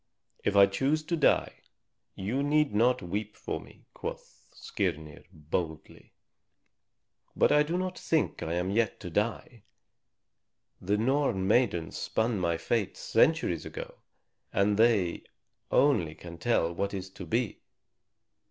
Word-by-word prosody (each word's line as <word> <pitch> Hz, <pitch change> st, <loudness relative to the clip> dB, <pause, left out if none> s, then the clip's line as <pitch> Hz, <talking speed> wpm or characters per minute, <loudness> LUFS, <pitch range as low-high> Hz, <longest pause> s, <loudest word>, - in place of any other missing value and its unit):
"If 105 Hz, -, 0 dB
I 100 Hz, 0 st, +9 dB
choose 135 Hz, +10 st, 0 dB
to 170 Hz, +2 st, -1 dB
die, 155 Hz, -, +2 dB, 0.6 s
you 110 Hz, +8 st, -2 dB
need 150 Hz, -3 st, +2 dB
not 125 Hz, +4 st, +3 dB
weep 105 Hz, +4 st, -4 dB
for -, -, -4 dB
me," -, -, -17 dB
quoth -, -, -8 dB
Skirnir 75 Hz, -1 st, -4 dB
boldly. 80 Hz, 0 st, -5 dB, 1.2 s
"But -, -, +4 dB
I 150 Hz, -, +5 dB
do 160 Hz, +4 st, 0 dB
not 185 Hz, 0 st, -3 dB
think 160 Hz, -2 st, 0 dB
that -, -, -4 dB
I -, -, -1 dB
am 90 Hz, +2 st, -1 dB
yet 110 Hz, +1 st, 0 dB
to 90 Hz, -, -7 dB
die. 115 Hz, +4 st, -2 dB, 1.2 s
The 100 Hz, +3 st, +1 dB
Norn 120 Hz, -5 st, +1 dB
maidens 100 Hz, -7 st, +1 dB
spun 110 Hz, -2 st, -1 dB
my 85 Hz, -2 st, 0 dB
fate 100 Hz, +4 st, -1 dB
centuries -, -, +2 dB
ago, -, -, -8 dB, 0.5 s
and 100 Hz, +1 st, +2 dB
they 110 Hz, -6 st, +3 dB, 0.5 s
only 85 Hz, -, +3 dB
can 85 Hz, -1 st, -10 dB
tell 85 Hz, -5 st, +1 dB
what 100 Hz, +3 st, -2 dB
is 95 Hz, -1 st, -5 dB
to 95 Hz, -1 st, -9 dB
be." 115 Hz, +4 st, -1 dB
105 Hz, 135 wpm, -29 LUFS, 90-125 Hz, 1.2 s, I